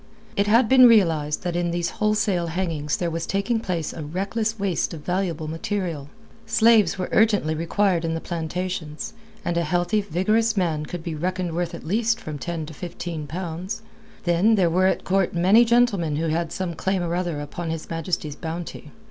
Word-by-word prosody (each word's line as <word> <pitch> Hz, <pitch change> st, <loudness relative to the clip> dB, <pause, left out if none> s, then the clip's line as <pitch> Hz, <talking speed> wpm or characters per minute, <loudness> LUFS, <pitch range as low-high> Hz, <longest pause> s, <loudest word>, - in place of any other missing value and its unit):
It 200 Hz, +1 st, +1 dB
had 230 Hz, +3 st, +5 dB
been 255 Hz, +1 st, +8 dB
realized 165 Hz, -10 st, +3 dB
that 175 Hz, -1 st, -2 dB
in 175 Hz, 0 st, 0 dB
these 170 Hz, 0 st, -1 dB
wholesale 210 Hz, -5 st, +1 dB
hangings 160 Hz, -4 st, -2 dB
there 170 Hz, -2 st, -1 dB
was 165 Hz, +1 st, -3 dB
taking 200 Hz, +4 st, 0 dB
place 175 Hz, -7 st, -3 dB
a 165 Hz, -, -7 dB
reckless 200 Hz, +8 st, -2 dB
waste 195 Hz, -4 st, -1 dB
of 150 Hz, -, -11 dB
valuable 175 Hz, -4 st, -1 dB
material. 165 Hz, -3 st, -3 dB, 0.4 s
Slaves 220 Hz, -4 st, +4 dB
were 185 Hz, -, -2 dB
urgently 205 Hz, -8 st, +3 dB
required 170 Hz, +2 st, +1 dB
in 165 Hz, 0 st, -1 dB
the -, -, -2 dB
plantations, 170 Hz, -1 st, -4 dB, 0.3 s
and 170 Hz, -, 0 dB
a 170 Hz, -, +2 dB
healthy, 175 Hz, +6 st, +1 dB
vigorous 215 Hz, +5 st, +1 dB
man 160 Hz, -5 st, 0 dB
could 175 Hz, -2 st, -6 dB
be 165 Hz, -, -4 dB
reckoned 180 Hz, +2 st, -2 dB
worth 175 Hz, 0 st, -2 dB
at -, -, -10 dB
least 225 Hz, +6 st, +1 dB
from 155 Hz, -8 st, -6 dB
ten 165 Hz, +1 st, -4 dB
to 160 Hz, -, -9 dB
fifteen 170 Hz, -2 st, -6 dB
pounds. 175 Hz, +3 st, -5 dB, 0.4 s
Then, 180 Hz, +6 st, +3 dB
there 180 Hz, -5 st, +3 dB
were 185 Hz, +2 st, +3 dB
at -, -, 0 dB
court 190 Hz, -2 st, +1 dB
many 190 Hz, +7 st, +6 dB
gentlemen 230 Hz, -10 st, +2 dB
who 160 Hz, +2 st, -1 dB
had 165 Hz, +1 st, -1 dB
some 180 Hz, -1 st, -3 dB
claim 190 Hz, +2 st, -1 dB
or 170 Hz, 0 st, -2 dB
other 175 Hz, -4 st, -1 dB
upon 160 Hz, +3 st, -5 dB
His 160 Hz, -1 st, -4 dB
Majesty's 165 Hz, -2 st, -3 dB
bounty. 165 Hz, -1 st, -6 dB
175 Hz, 185 wpm, -24 LUFS, 165-200 Hz, 0.4 s, been